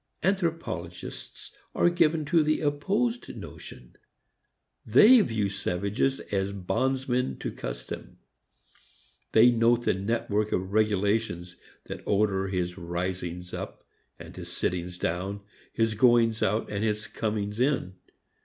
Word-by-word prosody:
Anthropologists 165 - -3 0.2
are 175 - +4
given 165 -3 +2
to 165 +2 +3
the 155 0 +1
opposed 200 +12 -1
notion. - - -11 0.9
They 250 +3 +7
view 110 - 0
savages 100 +7 -1
as 100 0 0
bondsmen 125 +6 -1
to - - -4
custom. - - -7 1.2
They 115 +2 +7
note 120 0 +3
the - - +2
network 105 +1 -1
of 95 +2 -2
regulations 105 -4 +1 0.3
that - - -7
order 100 -2 +2
his 90 -1 -2
risings 90 0 -4
up - - -6 0.3
and - - -11
his - - -8
sittings 90 0 -2
down, 95 +4 -2 0.3
his 115 -1 +1
goings 115 0 +4
out 105 +3 +1
and 100 0 -2
his 105 -1 -1
comings 105 0 -3
in. 130 -8 +1
105 Hz, 115 wpm, -27 LUFS, 95-130 Hz, 1.2 s, They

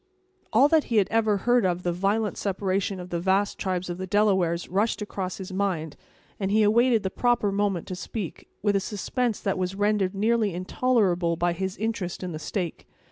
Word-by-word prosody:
All 255 +6 +6
that 315 -1 +3
he 230 - 0
had 200 - +4
ever 220 -2 +2
heard 240 +3 +2
of 180 -1 0
the 175 - 0
violent 200 +4 0
separation 195 -1 -1
of 180 0 -9
the 170 - -1
vast 195 +3 +1
tribes 185 -1 -2
of 175 0 -5
the 185 - -4
Delawares 190 -4 +2
rushed 205 +5 0
across 195 -3 -4
his 190 -1 -7
mind, 185 -6 -1 0.4
and 195 -2 -1
he 215 +2 +4
awaited 230 +1 +4
the 190 - -2
proper 240 -4 +1
moment 195 -3 0
to 185 - -3
speak, 200 -1 -6 0.2
with 205 -1 +2
a - - +4
suspense 220 +4 -2
that 195 -2 -1
was 185 +1 -2
rendered 205 -1 +1
nearly 215 -2 +1
intolerable 185 -3 +1
by 175 +1 +1
his 190 +3 -4
interest 205 -5 -3
in 180 - -4
the 155 - -5
stake. 175 -1 -4
195 Hz, 195 wpm, -26 LUFS, 180-215 Hz, 0.4 s, All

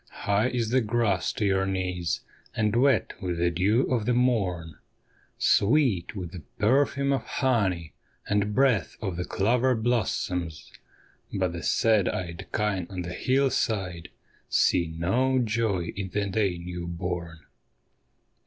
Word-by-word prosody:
High 100 +3 +2
is 120 -3 -1
the 130 +1 +4
grass 110 -4 +1
to 105 - -1
your 95 -1 +2
knees, 90 -3 -2 0.3
and 105 0 +1
wet 125 -4 +3
with 90 -3 -2
the 85 +1 +2
dew 100 +9 +2
of 115 -4 -1
the 125 - +3
morn, 95 -10 0 0.6
Sweet 110 - +2
with 90 -4 -5
the 90 -3 -8 0.2
perfume 140 +4 +2
of 135 - 0
honey, 100 - 0 0.3
and 105 0 0
breath 130 -6 +2
of 95 -5 -3
the 90 +1 -3
clover 125 +5 +2
blossoms; 90 - -1 0.6
But 95 -3 -1
the 85 - -5
sad 110 -4 +2
eyed 85 -3 -5
kine 100 -5 -1
on 95 -2 -4
the 85 +1 -5
hillside 110 -10 0 0.4
see 85 -2 +3
no 95 +12 +1
joy 110 -7 0
in 95 -1 -4
the 100 +2 -1
day 100 -2 0
newborn. 85 -1 -5
100 Hz, 135 wpm, -27 LUFS, 90-115 Hz, 0.6 s, the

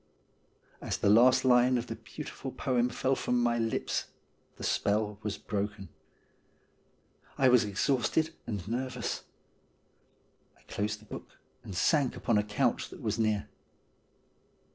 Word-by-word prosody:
As - - -2
the 100 - +3
last 125 +4 +6
line 125 0 +5
of 120 - -2
the 115 - -5
beautiful 135 +4 -8
poem 125 -2 +1
fell 130 +2 0
from 125 -1 0
my 120 -1 +2
lips 115 -1 -1 0.5
the - - -10
spell 105 0 0
was 105 -2 -3
broken. 100 -1 -4 1.5
I 130 - +5
was 125 -2 +6
exhausted 135 +9 +1
and 100 -5 -4
nervous. 125 +1 -3 1.3
I - - -25
closed 105 +1 -3
the - - -16
book, - - -10 0.3
and 95 - -8
sank 140 - +2
upon 110 -3 +1
a - - +1
couch 105 0 0
that - - -11
was - - -1
near. 110 -2 +1
115 Hz, 135 wpm, -30 LUFS, 105-125 Hz, 1.5 s, last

